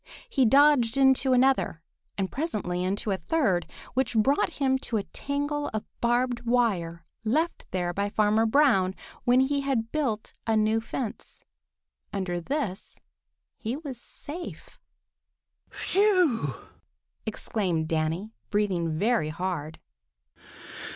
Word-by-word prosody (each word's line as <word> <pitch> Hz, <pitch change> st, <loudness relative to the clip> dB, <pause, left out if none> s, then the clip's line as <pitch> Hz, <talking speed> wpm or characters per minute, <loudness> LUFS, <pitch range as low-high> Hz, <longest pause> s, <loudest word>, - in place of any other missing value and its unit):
He 270 Hz, -, +2 dB
dodged 275 Hz, -1 st, +5 dB
into 265 Hz, 0 st, +4 dB
another 255 Hz, -10 st, +2 dB, 0.3 s
and 190 Hz, -2 st, -1 dB
presently 205 Hz, -, -2 dB
into 200 Hz, +3 st, -1 dB
a 190 Hz, -, +1 dB
third, 190 Hz, -, +1 dB, 0.3 s
which 255 Hz, -2 st, 0 dB
brought 270 Hz, +7 st, +2 dB
him 265 Hz, -2 st, +1 dB
to 230 Hz, -, -2 dB
a 200 Hz, -, -1 dB
tangle 290 Hz, +3 st, -2 dB
of 215 Hz, -, -3 dB, 0.2 s
barbed 240 Hz, +1 st, +2 dB
wire 200 Hz, -9 st, 0 dB, 0.2 s
left 310 Hz, +10 st, 0 dB
there 175 Hz, -1 st, -1 dB
by 200 Hz, +2 st, -1 dB
Farmer 215 Hz, +2 st, +3 dB
Brown 220 Hz, -8 st, +4 dB, 0.3 s
when 245 Hz, +1 st, +5 dB
he 280 Hz, +1 st, +1 dB
had 250 Hz, -5 st, -1 dB
built 255 Hz, -9 st, -2 dB
a 220 Hz, -1 st, +3 dB
new 215 Hz, +1 st, +2 dB
fence. 230 Hz, 0 st, -5 dB, 0.7 s
Under 180 Hz, -3 st, -2 dB
this 220 Hz, -, -3 dB, 0.6 s
he 240 Hz, 0 st, -2 dB
was 275 Hz, -6 st, -7 dB
safe. 330 Hz, +8 st, -8 dB, 0.9 s
"Phew!" 360 Hz, -, +2 dB, 0.7 s
exclaimed 185 Hz, -7 st, -1 dB
Danny, 165 Hz, +7 st, -1 dB, 0.2 s
breathing 180 Hz, -6 st, 0 dB
very 205 Hz, -4 st, +2 dB
hard. 160 Hz, -2 st, -4 dB
225 Hz, 115 wpm, -27 LUFS, 185-270 Hz, 0.9 s, dodged